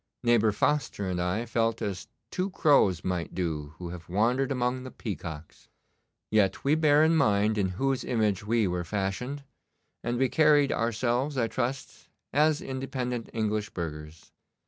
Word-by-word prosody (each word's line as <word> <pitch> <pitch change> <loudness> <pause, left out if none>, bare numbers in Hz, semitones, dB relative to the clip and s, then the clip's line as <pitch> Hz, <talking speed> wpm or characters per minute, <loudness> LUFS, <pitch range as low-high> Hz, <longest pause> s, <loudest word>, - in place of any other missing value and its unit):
Neighbour 115 -2 +4
Foster 105 -2 0
and 90 -1 -1
I 90 +7 -1
felt 115 0 0
as 95 -2 -4 0.2
two 185 +2 -1
crows 140 - +3
might 90 -3 -3
do 80 -4 -3
who 90 -1 -6
have 85 -1 -9
wandered 120 +8 +1
among 125 0 0
the 130 - -7
peacocks. 85 -10 -7 0.6
Yet 105 -3 +2
we 140 - +3
bare 155 -1 +4
in 160 +1 +4
mind 105 -6 +3
in 100 -3 +1
whose 135 0 0
image 105 -4 0
we 110 0 +1
were 90 -1 -2
fashioned, 105 +9 -3 0.6
and 120 0 -1
we 130 +1 +3
carried 150 -1 +4
ourselves, 120 +5 0
I 115 -3 +2
trust, 130 +3 -4 0.2
as 150 +2 +3
independent 130 -2 -4
English 110 -1 -1
burghers. 75 -2 -7
115 Hz, 150 wpm, -28 LUFS, 95-135 Hz, 0.6 s, Neighbour